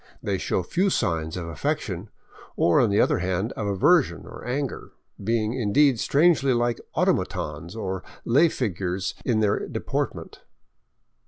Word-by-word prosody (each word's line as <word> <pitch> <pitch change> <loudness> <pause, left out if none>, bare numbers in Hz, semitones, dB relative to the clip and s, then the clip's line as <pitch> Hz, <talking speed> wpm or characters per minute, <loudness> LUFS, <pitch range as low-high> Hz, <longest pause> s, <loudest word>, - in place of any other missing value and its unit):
They 100 -2 -1
show 90 - -1
few 185 - +1
signs 80 - -1
of 85 -2 -5
affection, 80 -4 -3 0.5
or 85 - +3
on 120 - +3
the 100 - +2
other - - +3
hand 95 +4 -1
of 105 - -4
aversion 100 -2 +3
or - - -10
anger, 135 +1 -4 0.3
being, 110 +1 0
indeed, 130 +2 +3
strangely 140 -2 +3
like 120 -1 0 0.2
automatons 85 +5 -1
or 95 -4 -4 0.2
lay 145 +8 +5
figures 95 - -2
in 115 -4 +1
their 105 -2 +1
deportment. - - -4
110 Hz, 140 wpm, -25 LUFS, 95-125 Hz, 0.5 s, lay